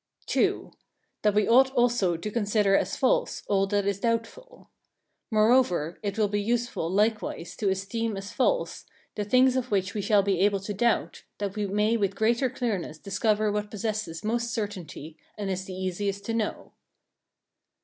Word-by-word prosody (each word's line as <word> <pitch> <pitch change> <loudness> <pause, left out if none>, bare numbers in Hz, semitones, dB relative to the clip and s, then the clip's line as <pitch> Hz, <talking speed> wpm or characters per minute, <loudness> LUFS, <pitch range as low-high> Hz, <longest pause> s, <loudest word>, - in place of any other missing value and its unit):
II. - - +1 0.5
That 210 -1 +2
we 210 - +3
ought 260 +3 +6
also 240 -8 +2
to 210 +5 -5
consider 205 -2 +2
as - - 0
false - - +1
all 195 -1 +1
that 205 0 0
is 200 -1 -1
doubtful. 230 - -3 0.6
Moreover, 215 -8 +2
it 200 -1 -3
will 215 -2 +3
be 205 0 -1
useful 235 -6 -1
likewise 210 -3 -1
to 205 - 0
esteem 205 +3 -2
as 195 +1 -7
false - - 0 0.3
the 210 - -2
things 255 +4 +4
of 255 -1 -1
which 195 -2 0
we 210 - -2
shall 205 -1 +3
be 195 -3 0
able 200 +1 +3
to 205 +2 -4
doubt, 235 +3 0
that 200 -1 -3
we 210 -1 -1
may 210 +3 +1
with 200 -2 -1
greater 235 +5 +2
clearness 225 - -3
discover 210 +3 0
what 210 0 -2
possesses 210 -5 -4
most 235 +2 -1
certainty 180 -8 -5 0.2
and 200 -2 -3
is 190 0 -3
the 190 - -7
easiest 195 +2 -3
to 230 - -2
know. 225 -2 -3
210 Hz, 170 wpm, -27 LUFS, 195-230 Hz, 0.6 s, ought